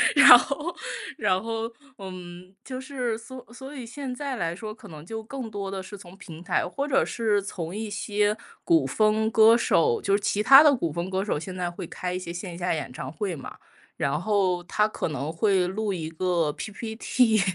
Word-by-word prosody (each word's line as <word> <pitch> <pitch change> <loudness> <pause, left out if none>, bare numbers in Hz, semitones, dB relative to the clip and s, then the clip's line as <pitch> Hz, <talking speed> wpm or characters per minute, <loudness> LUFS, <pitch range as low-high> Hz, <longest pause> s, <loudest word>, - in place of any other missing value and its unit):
然 255 -4 +11
后 300 +7 -3 0.4
然 185 +1 +1
后， 225 0 -3 0.3
嗯， 185 -1 -9
就 255 -1 -6
是 255 -4 -3
所 255 +3 -10
所 265 +4 -10
以 255 - -6
现 265 +1 -6
在 275 0 -4
来 170 -5 -2
说， 215 +3 -6
可 235 -4 -14
能 155 -2 -10
就 220 +6 -6
更 250 -1 -6
多 200 -2 -5
的 195 - -4
是 200 +2 -9
从 180 0 -13
平 170 -4 -11
台， 180 -1 +1
或 280 +10 -3
者 275 -1 +3
是 215 -3 0
从 180 -3 -6
一 215 0 -4
些 205 +1 0 0.3
古 330 -2 +3
风 215 0 +2
歌 225 +1 +7
手， 455 - +2
就 200 - +1
是 205 - -1
其 210 +1 0
他 270 +5 +10
的 295 -2 +6
古 170 -10 -2
风 170 +3 -3
歌 190 +1 -1
手 175 - -1
现 185 +3 -7
在 175 -1 -2
会 - - -7
开 180 -1 -4
一 180 - -2
些 175 -2 -6
线 175 0 -6
下 180 +1 -2
演 145 -5 -5
唱 130 +1 -6
会 185 0 -3
嘛， 135 - -9 0.4
然 140 +3 0
后 190 -3 +1
他 210 +4 +2
可 215 - -3
能 150 +1 -4
会 190 0 +2
录 205 +3 -2
一 165 -4 -3
个 170 -3 0
PP 220 - -6
T， 225 -4 +3
205 Hz, 230 characters per minute, -26 LUFS, 180-235 Hz, 0.4 s, 然